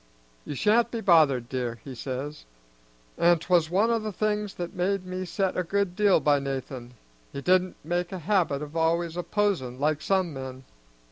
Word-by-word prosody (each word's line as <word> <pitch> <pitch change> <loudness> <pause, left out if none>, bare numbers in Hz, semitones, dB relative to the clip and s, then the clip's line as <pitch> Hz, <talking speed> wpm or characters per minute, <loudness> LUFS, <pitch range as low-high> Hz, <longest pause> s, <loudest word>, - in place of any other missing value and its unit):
'You 145 - -5
sha'n't 225 - +3
be 235 - -4
bothered, 155 - +4
dear,' 120 -3 -3
he 135 - -8
says; 135 +4 -6 0.7
an' 175 0 +5
'twas 165 -1 +2
one 205 +6 +2
o' 230 - +2
the 215 -1 -4
things 210 0 -1
that 175 0 -5
made 185 +1 -1
me 185 0 -4
set 190 +1 -1
a - - +1
good 190 +1 -1
deal 205 -3 +4
by 145 -2 +3
Nathan, 130 -2 -5 0.4
he - - -5
did 185 +6 +4
not 185 0 -8
make 175 +2 -2
a 190 - -4
habit 170 -5 0
of 150 +2 -9
always 165 +1 +1
opposin', 175 -8 -1
like 150 +1 +1
some 185 -3 0
men. 130 -1 -7
175 Hz, 185 wpm, -27 LUFS, 140-195 Hz, 0.7 s, an